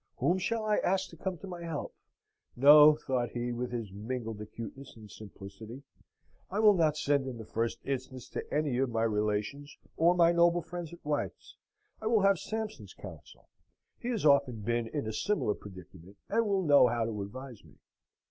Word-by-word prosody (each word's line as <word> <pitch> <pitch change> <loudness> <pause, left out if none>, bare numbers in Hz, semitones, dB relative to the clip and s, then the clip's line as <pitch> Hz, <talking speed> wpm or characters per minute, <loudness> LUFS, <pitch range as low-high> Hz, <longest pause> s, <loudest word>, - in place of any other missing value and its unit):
Whom 180 +2 +1
shall 220 +4 -1
I 210 -1 +2
ask 190 +1 0
to - - -11
come 185 +2 -4
to 195 - -10
my 175 -2 -7
help? 165 -4 -5 0.6
No," 150 +3 +8
thought 130 -5 -2
he, 120 0 -2
with 120 +1 -3
his 115 -5 -4
mingled 110 +1 -5
acuteness 115 +5 -9
and 110 -3 -13
simplicity, 110 +5 -11 0.7
"I 195 - -4
will 215 -1 +7
not 155 -5 +2
send 140 -2 +1
in 125 -3 -5
the 110 - -8
first 115 +2 -2
instance 130 -2 -4
to - - -6
any 145 -4 0
of 135 -1 +1
my 115 -1 0
relations 105 +6 -2 0.2
or 170 +2 +4
my 170 -1 +5
noble 170 0 +3
friends 175 -3 -7
at 170 -2 -14
White's. 150 -1 -3 0.5
I 220 - -3
will 220 -3 +3
have 195 -3 +4
Sampson's 215 - -5
counsel. 85 -7 -12 0.5
He - - -6
has 225 -9 -2
often 140 -6 +3
been 120 +2 -1
in 145 +2 -4
a 110 - -4
similar 200 - 0
predicament, 95 -1 -13
and 225 +1 +1
will 195 -2 +1
know 145 -5 +6
how 120 -1 0
to 110 -2 -4
advise 125 +3 -8
me." - - -19
135 Hz, 185 wpm, -30 LUFS, 115-170 Hz, 0.7 s, No